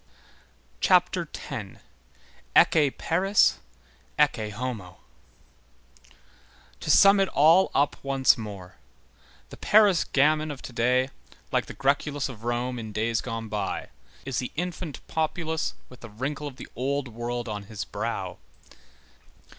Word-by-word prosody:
CHAPTER 180 - +3
X—ECCE 135 - -1
PARIS, 190 +5 +2 0.6
ECCE 110 -1 +2
HOMO 105 -5 -5 1.8
To - - -6
sum 200 0 +7
it 195 - +3
all 165 +6 +5
up 140 +1 +2
once 135 -1 +4
more, 100 -5 -9 0.7
the - - -10
Paris 205 -5 +4
gamin 155 +2 +2
of 145 -3 -7
to 125 - -8
day, 125 +3 +2 0.4
like - - 0
the - - -9
græculus 140 +1 0
of 115 -4 -10
Rome 120 +1 -2
in 110 -2 -7
days 110 +2 0
gone 115 -2 -5
by, 105 -1 -3 0.4
is 135 -2 -2
the 125 - -4
infant 175 -2 -5
populace 160 0 -2
with 125 - -15
the 120 - -10
wrinkle 140 +7 -4
of 140 - -8
the 130 - -10
old 140 +2 -1
world 120 +1 -4
on 105 -2 -5
his 100 -3 -6
brow. - - -4
130 Hz, 125 wpm, -26 LUFS, 115-155 Hz, 1.8 s, sum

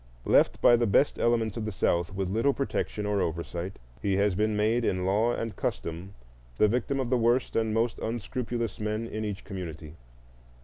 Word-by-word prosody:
Left - - +4
by 120 - +7
the 120 0 +1
best 120 +8 +3
elements 115 -3 +1
of 110 - -3
the 110 - -2
South 85 -2 0
with 95 0 -2
little 115 +9 +1
protection 110 -6 -2
or 105 -1 +1
oversight, 85 +3 -3 0.2
he 100 -2 +1
has 100 0 +2
been 105 +2 0
made 110 +3 +2
in 90 -4 0
law 105 +5 +2
and 115 -4 -4
custom 85 +4 -4 0.4
the 105 - +5
victim 125 +5 0
of 130 -2 -2
the 125 - +3
worst 120 +2 +2
and 110 -1 +1
most 115 +1 0
unscrupulous 115 0 -3
men 110 +1 -2
in 110 -1 -4
each 105 -2 -4
community. 85 -5 -7
110 Hz, 185 wpm, -28 LUFS, 95-115 Hz, 0.4 s, by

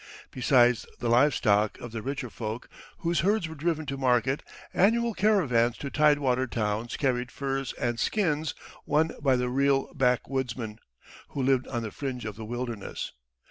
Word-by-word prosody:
Besides 125 -2 +3
the 120 - -2
live 130 +3 +5
stock 105 -2 +2
of 120 - -8
the 115 -1 -4
richer 135 -1 -4
folk, 110 +1 -5 0.3
whose 170 -1 +1
herds 200 -1 +2
were 160 - -7
driven 160 0 -1
to 140 -1 -4
market, 130 +1 +2 0.3
annual 230 +4 +3
caravans 145 - +2
to 140 - -5
tidewater 140 -4 +3
towns 110 0 -2
carried 125 -2 0
furs 135 -1 -2
and 120 -1 -2
skins 160 -7 0 0.3
won 155 +2 +2
by 135 -3 +4
the 125 0 0
real 135 +1 +1
backwoodsmen, 125 -3 -1 0.5
who 135 - -3
lived 130 -1 +2
on 120 -3 -3
the 110 - -5
fringe 130 -2 -4
of 110 -2 -5
the 110 0 -7
wilderness. 120 -2 -4
130 Hz, 160 wpm, -28 LUFS, 120-145 Hz, 0.5 s, live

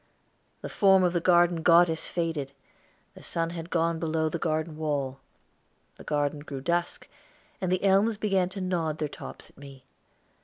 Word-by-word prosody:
The - - -5
form 195 -2 +4
of 180 -1 +2
the 175 - +1
garden 175 -1 +3
goddess 165 -1 +4
faded, 160 -5 -3 0.6
the - - -14
sun 165 0 -3
had 170 -1 -7
gone 165 -1 0
below 160 -1 0
the 170 - -4
garden 155 0 -2
wall. 140 -4 -2 0.8
The - - -12
garden 145 0 -1
grew 145 -2 -7
dusk, 170 +4 -2 0.5
and 185 -1 -1
the 185 +1 0
elms 200 +3 +3
began 195 -4 +1
to 195 +1 -7
nod 170 -4 -1
their 155 - -2
tops - - -10
at - - -22
me. 135 -2 -13
165 Hz, 165 wpm, -27 LUFS, 155-180 Hz, 0.8 s, form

